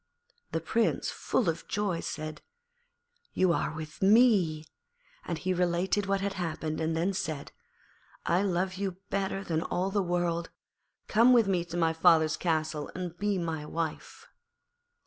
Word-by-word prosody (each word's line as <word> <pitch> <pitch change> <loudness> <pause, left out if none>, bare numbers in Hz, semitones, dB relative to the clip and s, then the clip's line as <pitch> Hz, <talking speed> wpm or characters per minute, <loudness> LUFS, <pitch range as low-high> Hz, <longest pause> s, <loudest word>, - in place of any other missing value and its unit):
The 165 - -1
Prince, 225 +8 0
full 240 - -1
of 165 -1 -2
joy, 200 -5 -1
said, 155 -2 -5 0.9
'You 185 -2 +3
are - - -1
with 155 0 -8
me,' 195 -7 +4 0.6
and - - -3
he 185 0 -1
related 180 +3 +1
what 195 0 +1
had 200 0 -1
happened, 160 -3 -3
and 160 0 0
then 180 +4 +1
said, 155 -6 -4 0.7
'I 175 +2 +2
love 185 -1 0
you 195 -1 -2 0.2
better 195 0 -1
than 160 -3 -1
all 185 +2 -1
the 200 0 +1
world; 175 -2 -1 0.6
come 235 +4 +5
with 230 -4 +5
me 180 -3 +1
to 170 0 -6
my 165 -1 +2
father's 160 -1 +4
castle 155 -3 -1
and 180 -2 -4
be 205 -1 +1
my 165 -3 -3
wife.' 160 +1 -5
175 Hz, 150 wpm, -29 LUFS, 160-195 Hz, 0.9 s, come